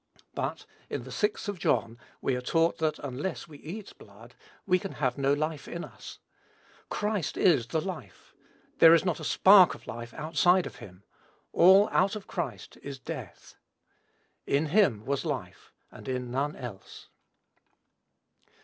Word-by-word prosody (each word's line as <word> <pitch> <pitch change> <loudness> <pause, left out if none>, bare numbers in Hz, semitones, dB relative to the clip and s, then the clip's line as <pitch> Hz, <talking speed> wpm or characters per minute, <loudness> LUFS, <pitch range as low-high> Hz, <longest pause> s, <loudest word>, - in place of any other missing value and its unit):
But, - - -4 0.2
in - - -4
the - - -10
sixth 210 +1 -1
of 200 -3 -4
John 115 -8 0 0.2
we 135 - 0
are 125 - -3
taught 165 +6 +1
that 155 -1 0
unless 145 +6 -5
we 150 -3 -13
eat 195 +7 -8
blood 115 +4 -15 0.3
we 185 -1 +3
have 145 -10 -2
no 135 0 +2
life 150 0 -2
in 170 - -5
us. - - -11 0.7
Christ 210 -6 -2
is 145 -11 +3
the 160 - -1
life. 155 - -8 0.5
There 165 0 +9
is 170 - +1
not 175 -4 0
a - - -8
spark 190 -2 +6
of - - -16
life 120 0 -7
outside 175 +3 +2
of - - -8
him. 100 -5 -13 0.5
All 190 +4 +7
out 195 +3 +2
of 210 - -7
Christ 130 - -6
is 140 -1 -7
death. - - -9 0.9
"In 145 +2 +1
him 150 - +3
was 140 0 -1
life," - - -5 0.2
and - - -12
in 125 -2 -3
none 140 +4 -1
else. 115 -7 -10
155 Hz, 155 wpm, -28 LUFS, 125-185 Hz, 0.9 s, There